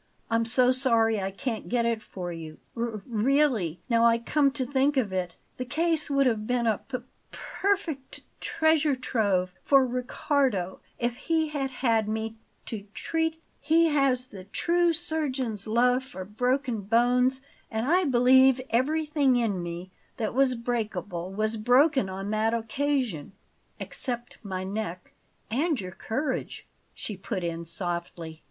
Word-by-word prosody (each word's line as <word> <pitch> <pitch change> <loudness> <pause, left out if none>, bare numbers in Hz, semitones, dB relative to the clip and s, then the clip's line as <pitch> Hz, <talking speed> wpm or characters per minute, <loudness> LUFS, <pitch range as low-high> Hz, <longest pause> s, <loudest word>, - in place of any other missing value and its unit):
I'm 230 0 +2
so 250 +2 +4
sorry 230 -5 +2
I 190 - -1
can't 220 +3 -4
get 240 -1 +1
it 230 -1 0
for 180 -4 -6
you. 160 -2 -8 0.2
R 230 -3 -3
really, 235 - +1
now 230 -2 +3
I 230 0 +5
come 280 +5 +2
to 260 -2 -1
think 275 +2 +1
of 215 -7 +1
it, 180 -2 -2 0.2
the 255 - -2
case 315 +4 0
would 275 -1 +3
have 220 -4 0
been 245 -1 +1
a 220 -3 +2
p 260 - -5 0.3
perfect 370 -9 -2
t - - -8 0.2
treasure 315 -3 +2
trove 200 -8 0
for 275 -2 +5
Riccardo 250 -5 0 0.2
if 240 0 -1
he 320 +1 0
had 280 -3 -2
had 230 -4 +1
me 220 +1 -3 0.3
to 210 -3 -6
treat; 320 0 -1 0.2
he 325 +2 +4
has 275 -4 +2
the 190 -2 -10
true 345 - +2
surgeon's 285 - -2
love 245 +3 +3
for 190 -8 -8
broken 245 +2 0
bones, 245 +5 +3 0.3
and 220 +1 -2
I 355 +6 +3
believe 260 0 +5
everything 290 +2 +2
in 220 -7 0
me 175 +2 -6 0.3
that 220 -4 -2
was 260 0 +3
breakable 215 -6 -3
was 215 +3 -1
broken 250 +1 +4
on 195 +2 -4
that 220 +1 +1
occasion 235 - -1 0.5
except 240 -2 -5
my 190 -3 -4
neck." 190 -2 -5 0.4
"And 295 +4 +1
your 185 -1 -5
courage," 260 - -3 0.3
she 210 - -5
put 190 -1 -4
in 170 0 -3
softly. 170 -2 -4
240 Hz, 150 wpm, -27 LUFS, 210-275 Hz, 0.5 s, I